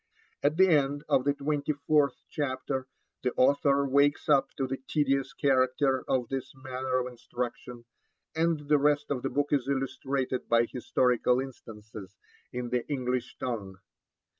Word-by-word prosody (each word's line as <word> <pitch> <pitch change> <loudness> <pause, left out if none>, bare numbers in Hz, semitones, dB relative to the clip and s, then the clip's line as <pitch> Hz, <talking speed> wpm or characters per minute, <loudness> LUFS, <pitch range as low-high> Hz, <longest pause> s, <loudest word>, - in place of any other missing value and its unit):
At 150 +2 +1
the 190 0 +6
end 145 -3 +2
of 130 - +2
the 145 0 +2
twenty 145 +1 -1
fourth 145 -1 +1
chapter 130 -2 -3 0.3
the 125 - -1
author 140 +1 +3
wakes 140 +2 +2
up 135 -2 +4
to 135 - 0
the 135 +1 -3
tedious 135 -2 +1
character 130 -2 +2
of 125 -3 +1
this 135 0 -4
manner 130 -1 -3
of 125 - -2
instruction, 120 0 -6 0.5
and 165 -1 +1
the 150 0 +4
rest 145 0 +2
of 130 -3 -1
the 135 - -2
book 145 0 0
is 135 -3 +1
illustrated 135 -1 -2
by 115 0 +4
historical 125 0 +1
instances 110 -6 -9 0.4
in 125 -1 -4
the 125 -1 +1
English 125 -3 -2
tongue. 105 -7 -4
135 Hz, 150 wpm, -29 LUFS, 125-145 Hz, 0.5 s, the